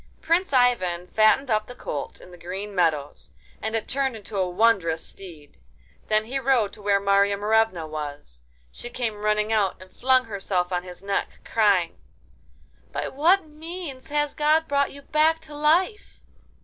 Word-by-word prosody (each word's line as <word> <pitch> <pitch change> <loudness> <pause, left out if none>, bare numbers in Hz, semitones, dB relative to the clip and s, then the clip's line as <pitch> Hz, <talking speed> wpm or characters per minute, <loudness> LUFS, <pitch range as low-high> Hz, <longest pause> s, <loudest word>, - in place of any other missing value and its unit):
Prince 340 +2 +1
Ivan 235 -10 +2
fattened 220 +4 +3
up 215 0 +1
the 245 - -10
colt 145 - -5
in 180 - -14
the 175 - -12
green 195 +4 -6
meadows, 160 -6 -1 0.3
and 220 +1 -2
it 225 - -1
turned 265 -2 -1
into 215 0 -9
a 185 -2 0
wondrous 180 -5 +2
steed. 165 -7 -13 0.5
Then 215 0 +2
he 265 +4 -3
rode 250 -6 +2
to - - -13
where 200 -1 +2
Marya 200 0 +3
Morevna 210 -4 +1
was. 145 - -7 0.3
She 240 - -8
came 240 -2 -2
running 210 +1 +1
out, 205 -4 +1
and 185 0 -15
flung 255 0 +3
herself 195 -4 -2
on 175 - 0
his 180 +1 -11
neck, 200 0 -3
crying: 200 - +2 0.9
'By - - -3
what 335 +7 +3
means 315 -2 -8
has 295 0 0
God 310 +2 +2
brought 280 -2 +1
you 280 0 -12
back 315 +2 +2
to 310 -1 -11
life? 335 +8 +1
215 Hz, 165 wpm, -24 LUFS, 185-275 Hz, 0.9 s, fattened